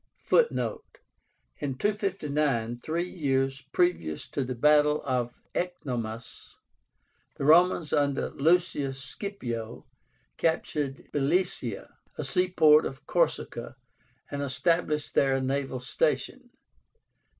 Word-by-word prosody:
(Footnote: 475 0 +1 0.6
In 135 -3 -3
259, 150 - -1
three 170 +6 -2
years 135 -5 -1
previous 120 - 0
to 140 - -1
the 130 0 -4
battle 150 +3 +4
of 125 -3 -1 0.2
Ecnomus, 120 -10 -5 0.8
the 140 - -2
Romans 165 0 +5
under 140 -1 +1
Lucius 145 -4 +1
Scipio 120 - -6 0.5
captured 150 -4 -1
Blesia, 145 - 0 0.3
a - - -3
seaport 160 -4 +4
of 135 +1 -10
Corsica, 155 -8 -1 0.6
and 145 0 -3
established 150 +2 0
there 135 -1 +3
a - - +1
naval 135 0 -2
station.) 125 - -1
145 Hz, 95 wpm, -28 LUFS, 130-170 Hz, 0.8 s, Romans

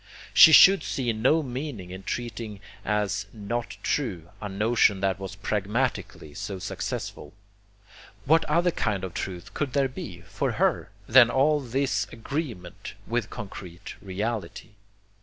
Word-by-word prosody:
She 160 - +10
could 195 +5 +9
see 120 -4 -1
no 130 +9 +2
meaning 125 -8 -6
in 95 +1 -7
treating 115 -1 -5 0.2
as 105 -1 -1
'not 115 +3 -4
true' 90 - -2
a 105 - -4
notion 105 0 +2
that 95 -2 0
was 95 0 -6
pragmatically 105 - -2
so 100 0 -5
successful. 75 -4 -5 0.9
What 160 +3 +4
other 170 +3 +2
kind 105 - -1
of 95 -2 -5
truth 95 +2 -6
could 140 -4 -2
there 140 -2 +2
be, 90 -9 -8
for 85 - -3
her, - - +1 0.2
than 120 0 +7
all 150 +4 +3
this 130 -5 -1
agreement 115 - -6
with 115 -1 -2
concrete 90 -3 -8
reality? 105 +3 -4
110 Hz, 135 wpm, -26 LUFS, 95-130 Hz, 0.9 s, She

